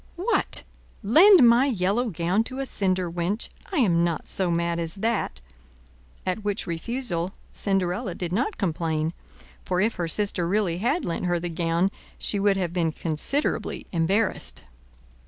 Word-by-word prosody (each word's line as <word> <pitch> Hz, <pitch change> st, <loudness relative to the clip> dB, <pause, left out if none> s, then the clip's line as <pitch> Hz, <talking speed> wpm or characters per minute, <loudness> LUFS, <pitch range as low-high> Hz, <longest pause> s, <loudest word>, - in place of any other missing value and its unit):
"What, 385 Hz, +7 st, 0 dB, 0.4 s
lend 320 Hz, -, +7 dB
my 240 Hz, +4 st, +5 dB
yellow 220 Hz, +1 st, +1 dB
gown 175 Hz, +4 st, +1 dB
to 255 Hz, -, -6 dB
a 270 Hz, -, -1 dB
cinder 185 Hz, -6 st, 0 dB
wench! 175 Hz, +6 st, -2 dB, 0.2 s
I 375 Hz, -, -2 dB
am 175 Hz, -, +3 dB
not 170 Hz, -3 st, -1 dB
so 190 Hz, -2 st, +1 dB
mad 170 Hz, 0 st, 0 dB
as 165 Hz, +1 st, -3 dB
that;" 205 Hz, -, -1 dB, 0.8 s
at 185 Hz, +3 st, -2 dB
which 205 Hz, 0 st, -2 dB
refusal 180 Hz, 0 st, -3 dB, 0.2 s
Cinderella 190 Hz, +1 st, -1 dB
did 175 Hz, -2 st, -4 dB
not 255 Hz, -, -1 dB
complain, 160 Hz, -3 st, -1 dB, 0.5 s
for 180 Hz, -1 st, -1 dB
if 220 Hz, +4 st, +2 dB
her 175 Hz, -2 st, -1 dB
sister 185 Hz, -1 st, 0 dB
really 185 Hz, -3 st, 0 dB
had 245 Hz, -, 0 dB
lent 170 Hz, +2 st, -2 dB
her 175 Hz, -1 st, +1 dB
the 175 Hz, +1 st, -4 dB
gown, 170 Hz, +2 st, +1 dB, 0.3 s
she 205 Hz, -, 0 dB
would 200 Hz, -1 st, +3 dB
have 175 Hz, -3 st, -2 dB
been 170 Hz, -3 st, +1 dB
considerably 165 Hz, -, -2 dB
embarrassed. 190 Hz, +5 st, 0 dB
185 Hz, 155 wpm, -25 LUFS, 170-220 Hz, 0.8 s, lend